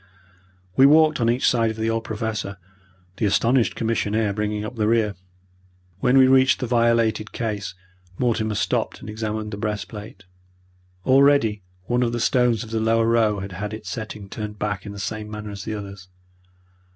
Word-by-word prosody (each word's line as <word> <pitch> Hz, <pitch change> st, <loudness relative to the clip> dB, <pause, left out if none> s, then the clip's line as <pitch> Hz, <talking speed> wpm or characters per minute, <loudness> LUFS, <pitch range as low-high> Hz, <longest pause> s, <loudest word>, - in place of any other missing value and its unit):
We 135 Hz, -, +7 dB
walked 155 Hz, -1 st, +5 dB
on 115 Hz, -, +3 dB
each 120 Hz, +2 st, +2 dB
side 115 Hz, -2 st, +3 dB
of 110 Hz, -, -5 dB
the 110 Hz, 0 st, 0 dB
old 115 Hz, 0 st, -1 dB
Professor, 110 Hz, -2 st, -4 dB, 0.6 s
the 110 Hz, -, +1 dB
astonished 115 Hz, +4 st, +2 dB
commissionaire 110 Hz, -2 st, 0 dB
bringing 105 Hz, 0 st, -2 dB
up 110 Hz, -, -7 dB
the 105 Hz, -2 st, 0 dB
rear. 110 Hz, -2 st, +2 dB, 0.9 s
When 125 Hz, +6 st, +3 dB
we 130 Hz, -, +8 dB
reached 130 Hz, +1 st, +4 dB
the 130 Hz, -, -2 dB
violated 115 Hz, -2 st, +1 dB
case, 105 Hz, -4 st, -3 dB, 0.4 s
Mortimer 110 Hz, -3 st, 0 dB
stopped -, -, -1 dB
and 105 Hz, -, -8 dB
examined 110 Hz, 0 st, -4 dB
the 100 Hz, -, -5 dB
breastplate. 105 Hz, -1 st, -5 dB, 0.8 s
Already 135 Hz, -6 st, +4 dB, 0.2 s
one 120 Hz, +6 st, 0 dB
of 120 Hz, -1 st, 0 dB
the 120 Hz, -, -1 dB
stones 120 Hz, -1 st, +2 dB
of 110 Hz, -, -11 dB
the 115 Hz, -, 0 dB
lower 115 Hz, +1 st, +2 dB
row 110 Hz, -3 st, +2 dB
had 100 Hz, 0 st, -6 dB
had 105 Hz, +3 st, -5 dB
its 105 Hz, -3 st, -8 dB
setting 110 Hz, -2 st, -6 dB
turned 105 Hz, +1 st, -6 dB
back 105 Hz, -1 st, -3 dB
in -, -, -6 dB
the 100 Hz, -, -9 dB
same 105 Hz, +1 st, -4 dB
manner 105 Hz, -1 st, -6 dB
as 100 Hz, -1 st, -8 dB
the 110 Hz, -, -3 dB
others. 100 Hz, -3 st, -8 dB
110 Hz, 175 wpm, -23 LUFS, 105-115 Hz, 0.9 s, we